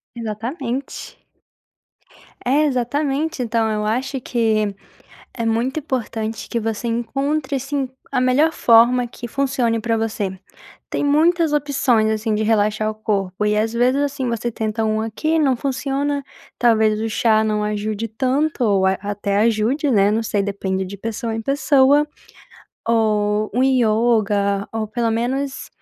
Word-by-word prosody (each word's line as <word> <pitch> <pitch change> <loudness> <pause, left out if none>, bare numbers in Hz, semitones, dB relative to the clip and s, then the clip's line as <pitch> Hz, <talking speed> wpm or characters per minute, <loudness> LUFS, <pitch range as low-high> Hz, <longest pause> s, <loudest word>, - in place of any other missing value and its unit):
Exatamente. 235 +4 -5 1.2
É 280 +5 +3
exatamente, 280 +3 -1
então 225 -1 0
eu 210 0 -1
acho 260 +5 -1
que 220 -4 0 0.6
é 230 - -3
muito 235 +7 0
importante 225 -5 -4
que 235 - -2
você 225 +1 -3
encontre 275 +5 -1
assim 275 0 -2 0.2
a - - +1
melhor 260 +6 +3
forma 240 -1 +4
que 240 - -8
funcione 250 -3 0
pra 230 0 0
você. 210 -4 -2 0.5
Tem - - -1
muitas 320 +2 +3
opções 260 -7 +2
assim 220 0 -1
de 215 - 0
relaxar 215 0 +1
o - - -7
corpo 205 -2 -2
e 210 0 +2
às 220 +1 0
vezes 250 +4 +2
assim 275 -3 -2
você 235 0 -2
tenta 220 0 -2
um 215 0 0
aqui 310 +9 -1
não 270 -5 +2
funciona, 275 +2 -2 0.4
talvez 220 -3 +3
o 225 - -1
chá 220 0 +2
não 210 -1 0
ajude 210 +1 -2
tanto 260 +6 0
ou 195 -3 +3
até 200 +1 -1
ajude, 230 +7 +1
né, 205 -3 +4
não 220 +2 +1
sei, 205 -2 0
depende 190 -1 -2
de 195 +2 -7
pessoa 225 +1 -4
em 225 - -3
pessoa, 280 +2 +3 0.8
ou 215 -2 +1
um 255 - +2
yoga 215 -5 +2
ou 220 -1 -2
pelo 230 +1 -1
menos 265 +4 -2
230 Hz, 145 wpm, -20 LUFS, 215-265 Hz, 1.2 s, forma